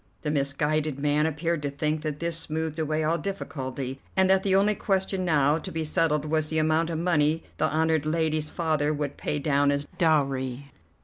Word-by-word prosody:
The 150 - -1
misguided 150 +1 0
man 150 +2 +2
appeared 160 +1 -1
to 145 - -2
think 150 +2 -2
that 150 -2 -3
this 170 -1 -1
smoothed 160 0 -2
away 155 0 0
all 165 +2 +1
difficulty, 135 -8 -5 0.2
and 190 0 +5
that 190 0 +4
the 190 -1 +2
only 200 +2 +4
question 190 -1 -1
now 150 -2 +3
to - - -7
be 160 0 -2
settled 155 -2 +1
was 155 0 0
the 160 - -1
amount 160 +1 +2
of 165 - -2
money 160 -2 +1
the - - +1
honoured 160 -1 +1
lady's 155 -1 0
father 155 -3 0
would 145 -1 -3
pay 150 - -2
down 145 -1 +2
as 140 0 0
dowry. 140 -4 +1
155 Hz, 190 wpm, -26 LUFS, 145-165 Hz, 0.2 s, and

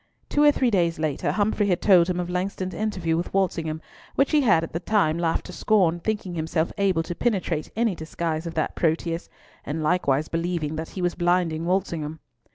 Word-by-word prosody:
Two 290 - +2
or 295 - +8
three 255 -4 +1
days 170 -4 +2
later 155 -3 -1
Humfrey 205 0 +1
had 180 -3 +1
told 185 -4 +5
him 180 -1 -1
of 175 - -2
Langston's 185 +1 -3
interview 185 -7 -1
with 170 +2 -2
Walsingham, 160 -5 -1 0.3
which 275 - +2
he 305 -2 +4
had 180 - +4
at 165 - -6
the 165 - -1
time 180 -4 +2
laughed 165 -1 0
to - - -9
scorn, 180 -6 +2
thinking 205 -1 -3
himself 160 0 -1
able 190 -5 +2
to 175 - -4
penetrate 180 -7 -1
any 225 -2 +1
disguise 160 0 -3
of 165 - -6
that 155 - -1
Proteus, 165 +1 -1 0.3
and 155 +3 -3
likewise 155 -3 +1
believing 165 -2 -2
that 160 +1 -5
he 185 - -5
was 175 - +1
blinding 175 -2 +1
Walsingham. 165 -5 -1
175 Hz, 195 wpm, -25 LUFS, 160-195 Hz, 0.3 s, or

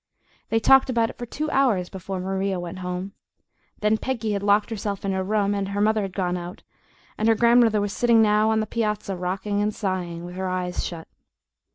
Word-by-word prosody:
They 225 - +2
talked 270 +4 +5
about 230 -2 +1
it - - -20
for 240 - -5
two 305 +5 -3
hours 230 -10 +2
before 190 +1 -6
Maria 190 0 -1
went 175 +1 -6
home. 180 +1 -4 0.7
Then 215 +1 +2
Peggy 235 -5 -2
had 200 -1 -1
locked 205 +2 +2
herself 200 -2 -4
in 195 - 0
her 190 0 -1
room, 205 0 +1
and 200 -1 -2
her 200 0 -3
mother 215 +1 +2
had 195 -1 -3
gone 180 -2 -1
out, 175 +1 -8 0.6
and 215 - +1
her 225 - +5
grandmother 235 -1 +4
was 205 0 -2
sitting 235 -2 +3
now 215 0 +4
on 220 0 +2
the - - -1
piazza, 210 -3 -2
rocking 190 +3 -2
and 210 0 -1
sighing, 180 -4 -3
with 175 - -8
her 190 0 -2
eyes 180 -1 -2
shut. 165 -2 -6
205 Hz, 210 wpm, -24 LUFS, 185-220 Hz, 0.7 s, talked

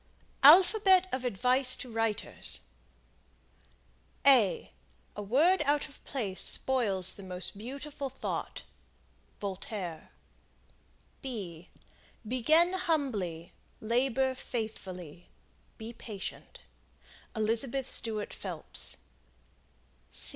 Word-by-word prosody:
ALPHABET 375 +5 +7
OF 255 0 -2
ADVICE 250 +4 +5
TO 250 - -6
WRITERS. 225 -1 -2 1.6
A 250 -9 +4 0.4
word 275 - +2
out 290 +1 +1
of 280 - -16
place 210 -9 -1
spoils 200 -8 +3
the - - -10
most 185 0 -5
beautiful 275 +5 -6
thought. 265 - -5 0.8
Voltaire. 190 -4 -6 1.1
Begin 245 - -2
humbly. 225 - -2 0.3
Labor 260 +3 +1
faithfully. 185 - -7 0.5
Be 225 +1 -8
patient. 210 -4 -8 0.7
Elizabeth 230 +5 0
Stuart 215 -5 -2
Phelps. - - -6
235 Hz, 75 wpm, -30 LUFS, 200-275 Hz, 1.6 s, ALPHABET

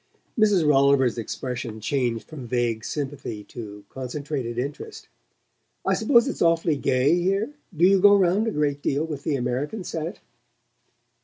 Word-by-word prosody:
Mrs. 205 -8 +3
Rolliver's 135 -4 +4
expression 120 -1 -5
changed 120 -1 -1
from 140 -6 -9
vague 115 -2 -1
sympathy 135 -4 -5
to 105 -3 -9
concentrated 130 -2 -4
interest. 145 - -6 0.8
"I - - +2
suppose 240 -2 +4
it's 275 - -4
awfully 165 -2 +3
gay 135 +1 +2
here? 195 +9 0 0.2
Do 170 - +5
you 195 0 +5
go 205 +1 +8
round 195 +3 +2
a - - 0
great 145 -4 -1
deal 145 +3 0
with 150 -4 -5
the 150 - 0
American 135 - -2
set?" 165 +3 -5
145 Hz, 145 wpm, -24 LUFS, 125-175 Hz, 0.8 s, go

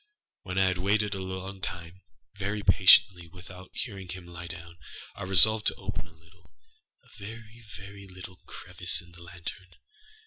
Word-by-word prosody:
When 95 0 -5
I 95 - +5
had 90 -1 +1
waited 105 +2 +2
a 95 - -3
long 95 +1 -5
time, 90 0 -6 0.3
very 100 +1 -2
patiently, 90 -4 +7
without 90 +1 -11
hearing 95 -6 -4
him 90 0 -6
lie 85 0 -8
down, 85 0 -8 0.3
I - - -10
resolved 110 +4 +5
to - - +2
open - - -4
a - - -19
littleâa 80 +2 -22 0.7
very, 110 +2 -10
very 100 0 -10
little 95 0 -10
crevice 90 -1 -1
in 85 - -17
the 85 0 -15
lantern. 85 +2 -8
95 Hz, 160 wpm, -29 LUFS, 85-100 Hz, 0.7 s, patiently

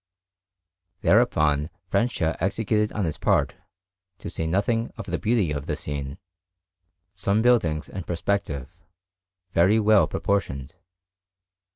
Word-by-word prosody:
Thereupon 75 -10 +3 0.2
Francia 90 -9 +1
executed 105 +3 0
on 105 -3 -1
his 80 - -3
part, - - +2 0.6
to 85 - -6
say 80 - -2
nothing 115 +6 0
of - - -6
the - - -3
beauty 110 -7 +1
of 70 -1 -4
the - - -1
scene, 70 0 -5 1.0
some 100 +3 +1
buildings 85 -11 +2
in 95 - -6
perspective, 85 -4 -2 0.8
very 95 +6 +4
well 105 -6 +5
proportioned. 80 -7 -2
95 Hz, 110 wpm, -25 LUFS, 75-105 Hz, 1.0 s, well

